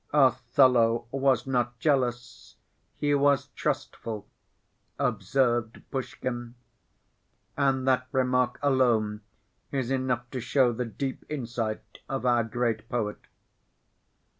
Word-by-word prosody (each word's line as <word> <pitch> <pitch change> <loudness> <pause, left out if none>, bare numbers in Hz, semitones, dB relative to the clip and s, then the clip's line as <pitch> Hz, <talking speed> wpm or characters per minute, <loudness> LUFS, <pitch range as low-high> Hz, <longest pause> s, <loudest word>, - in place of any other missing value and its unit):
"Othello 125 -3 +4
was 135 -3 +2
not 120 -2 0
jealous, 125 -3 -1 0.4
he 145 0 +1
was 140 -1 +3
trustful," 110 -6 -4 0.7
observed 120 -4 0
Pushkin. 120 -2 -4 1.0
And 135 -2 +1
that 130 -1 +2
remark 125 -2 +1
alone 115 -6 +2 0.5
is 135 -2 -1
enough 130 -2 0
to 130 - -3
show 125 0 +3
the 125 +2 -2
deep 130 +4 -4
insight 115 -6 -4
of 135 -1 -3
our 120 -1 +4
great 115 0 -2
poet. 110 -4 -2
125 Hz, 100 wpm, -27 LUFS, 120-135 Hz, 1.0 s, Othello